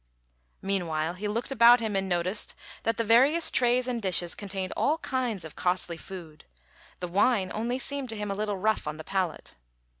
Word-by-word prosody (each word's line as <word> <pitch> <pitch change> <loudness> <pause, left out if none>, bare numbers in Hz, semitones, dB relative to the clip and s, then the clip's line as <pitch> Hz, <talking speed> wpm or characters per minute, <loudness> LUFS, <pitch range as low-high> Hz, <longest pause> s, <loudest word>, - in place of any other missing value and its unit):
Meanwhile, 170 -4 -1
he 200 +4 -5
looked 230 +5 -3
about 240 -1 +6
him 220 -3 -3
and 195 0 -1
noticed 180 +3 0 0.3
that 225 - -1
the 230 - 0
various 265 +9 +5
trays 250 0 +2
and 240 -2 -2
dishes 180 -3 +2
contained 190 -2 -5
all 305 +3 +1
kinds 250 - -3
of 160 - -10
costly 180 -1 0
food; 165 -3 -10 0.6
the 180 - -3
wine 195 +2 +1
only 235 +4 -2
seemed 275 0 -1
to 220 - -4
him 210 -1 -4
a - - -2
little 205 -1 -2
rough 215 -3 0
on 150 0 -4
the 160 - -8
palate. 185 - -3
205 Hz, 185 wpm, -27 LUFS, 180-235 Hz, 0.6 s, about